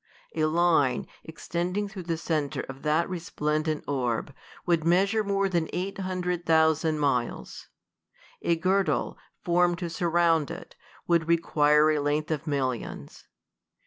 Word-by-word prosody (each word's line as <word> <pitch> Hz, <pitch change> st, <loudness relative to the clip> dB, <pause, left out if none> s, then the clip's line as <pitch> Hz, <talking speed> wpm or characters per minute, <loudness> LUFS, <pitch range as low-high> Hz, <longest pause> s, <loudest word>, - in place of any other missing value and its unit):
A 155 Hz, -1 st, +2 dB
line, 155 Hz, -5 st, +2 dB, 0.2 s
ex 160 Hz, -, -11 dB
tending 180 Hz, +5 st, -1 dB
through 195 Hz, -1 st, -8 dB
the 165 Hz, -, 0 dB
centre 155 Hz, -3 st, -2 dB
of 135 Hz, 0 st, -9 dB
that 155 Hz, +2 st, +1 dB
resplendent 155 Hz, -3 st, -2 dB
orb^ 125 Hz, -2 st, -2 dB, 0.3 s
would 170 Hz, -3 st, +2 dB
measure 195 Hz, +6 st, +2 dB
more 195 Hz, -1 st, +1 dB
than 170 Hz, -4 st, -1 dB
eight 190 Hz, +2 st, -3 dB
hundred 180 Hz, -2 st, -2 dB
thousand 160 Hz, -1 st, +3 dB
miles. 130 Hz, -5 st, -2 dB, 0.7 s
A 170 Hz, -, +2 dB
girdle, 185 Hz, +3 st, 0 dB, 0.2 s
formed 175 Hz, 0 st, +2 dB
to 180 Hz, -, -4 dB
suri'ound 165 Hz, -3 st, +2 dB
it, -, -, -9 dB, 0.3 s
w^ould 170 Hz, -2 st, +2 dB
require 155 Hz, -2 st, +3 dB
a 155 Hz, -, +1 dB
length 150 Hz, +2 st, -1 dB
of 155 Hz, +1 st, -3 dB
millions. 130 Hz, -5 st, -4 dB
165 Hz, 135 wpm, -27 LUFS, 150-175 Hz, 0.7 s, thousand